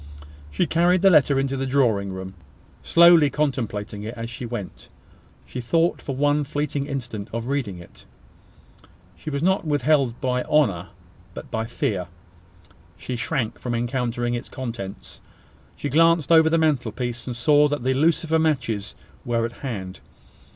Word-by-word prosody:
She 75 - 0
carried 175 +3 +2
the 195 - +7
letter 140 -4 +4
into 135 0 -1
the 135 0 -2
drawing 115 -8 +1
room, 95 0 -7 0.5
slowly 170 -3 +6
contemplating 115 -8 -2
it 110 +3 -6
as 115 +1 -5
she 120 +1 -6
went. 115 -5 -7 0.6
She 125 - -6
thought, 165 +8 +1
for 135 - -5
one 145 +2 +2
fleeting 145 0 -3
instant, 120 -7 -5
of 115 0 -4
reading 125 -8 -2
it. 85 -1 -15 1.1
She 155 - -7
was 140 0 -3
not 190 +2 +2
withheld 145 -4 +1
by 125 -1 0
honour, 105 - +2 0.5
but - - -9
by 110 0 -2
fear. 100 - -2 0.9
She 125 - -5
shrank 115 0 -2
from 120 -1 -3
encountering 120 0 -1
its 120 - -4
contents. 100 - -7 0.5
She - - -4
glanced 165 +1 +3
over 160 -1 +6
the 165 - +2
mantelpiece, 125 -6 -1
and 125 - -4
saw 145 +4 +4
that 145 -3 -3
the 130 +1 +2
lucifer 160 +3 +2
matches 125 -10 -1 0.3
were 115 -1 0
at 115 - -4
hand. 100 -9 -6
130 Hz, 150 wpm, -23 LUFS, 115-150 Hz, 1.1 s, the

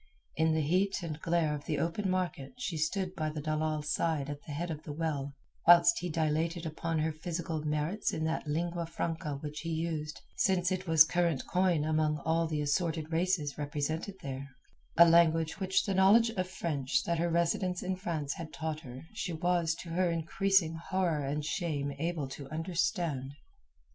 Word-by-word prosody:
In 160 0 +2
the 160 - +2
heat 185 +5 +1
and 155 -2 -5
glare 165 -3 +1
of 145 -1 -6
the 150 - -1
open 170 +6 -1
market 180 - -2
she 195 -9 -3
stood 180 +4 -1
by 155 -4 -2
the 155 0 -5
dalal's 155 0 -1
side 150 -4 0
at 145 0 -7
the - - -6
head 165 +4 -3
of 155 -1 -5
the 150 - -7
well, 145 -3 -3 0.3
whilst 170 0 +7
he 180 - -3
dilated 160 +2 0
upon 160 +1 -2
her 155 +1 +1
physical 160 0 -4
merits 150 +7 -1
in 160 - -3
that 160 -1 -1
lingua 170 +2 -1
franca 165 -2 -3
which 150 0 -5
he 165 - -5
used 160 -2 -3 0.2
since 185 -1 +2
it 185 0 -2
was 160 -1 +8
current 170 -4 0
coin 180 -4 +2
among 155 0 +1
all 165 +1 +2
the 155 -2 -1
assorted 160 +1 -1
races 165 -4 0
represented 150 +6 -2
there—a 135 +4 0
language 165 0 +4
which 190 -1 +2
the 195 - 0
knowledge 205 +5 +5
of 185 -4 -2
French 140 -8 -1
that 170 -1 -1
her 170 +1 +1
residence 170 +2 0
in 185 0 -1
France 165 -7 -3
had 165 -2 -7
taught 160 -1 -3
her 130 -4 -10
she 195 -5 -3
was 170 0 +1
to 170 - -9
her 180 +2 +1
increasing 170 +1 +2 0.2
horror 175 -6 +1
and 145 +2 -2
shame 150 -4 -1
able 165 -3 -1
to 135 0 -8
understand. 160 - -1
165 Hz, 180 wpm, -31 LUFS, 150-175 Hz, 0.3 s, was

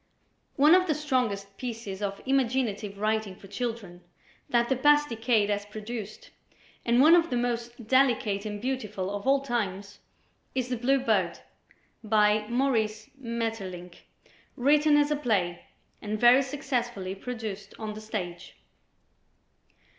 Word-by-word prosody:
One 300 +3 +6
of 370 0 +5
the 310 - +1
strongest 235 -10 -1
pieces 225 -5 -6
of 200 -1 -4
imaginative 240 -6 0
writing 215 -1 -1
for 195 - -15
children 205 -4 -5 0.5
that 235 -1 +2
the 265 - +1
past 295 +3 +4
decade 225 -2 +1
has 205 0 -1
produced 215 0 -7 0.5
and 235 +1 +2
one 315 +4 +7
of 335 -1 +3
the 245 - 0
most 240 -1 -3
delicate 240 -6 +2
and 210 -1 -5
beautiful 210 -6 -3
of 205 +4 -6
all 275 0 +4
times, 205 -6 -3 0.6
is 255 -1 -1
"The 250 - 0
Blue 265 +4 +2
Bird," 200 -8 0 0.6
by 210 0 +3
Maurice 225 -4 0
Maeterlinck, 225 -8 -5 0.6
written 295 +3 +4
as 290 0 +2
a - - +3
play, 200 -11 -1 0.3
and 215 0 -3
very 245 +3 +7
successfully 245 -8 -3
produced 210 -2 -6
on 215 -1 -5
the 215 - -9
stage. 180 -5 -6
225 Hz, 135 wpm, -27 LUFS, 205-255 Hz, 0.6 s, one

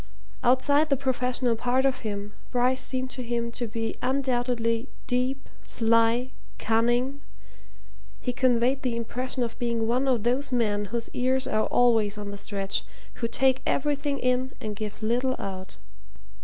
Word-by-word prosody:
Outside 285 +5 +4
the 275 - +3
professional 250 -2 0
part 250 +3 +1
of 270 -1 +2
him, 205 -1 -5 0.2
Bryce 255 +1 +2
seemed 255 0 -2
to 255 - -3
him 235 -1 -2
to 240 0 -2
be 225 +1 -3
undoubtedly 245 -2 0 0.2
deep, 255 +2 0
sly, 230 +2 +2 0.3
cunning 240 +5 +1 1.0
he 250 - -2
conveyed 255 +1 +2
the 250 -3 -1
impression 250 +2 -2
of 230 +1 -4
being 235 -2 0
one 250 +4 +1
of 245 -5 +2
those 255 +4 +1
men 210 -4 +1
whose 230 +3 -3
ears 260 +1 +1
are 215 0 +1
always 225 -4 +3
on 205 -1 -5
the 200 - -6
stretch, 195 -1 -1 0.4
who 230 - +1
take 265 +2 +2
everything 285 0 0
in 255 +1 0
and 215 -1 -4
give 215 +1 -6
little 250 +4 +1
out. 190 -1 -6
245 Hz, 150 wpm, -27 LUFS, 230-260 Hz, 1.0 s, Outside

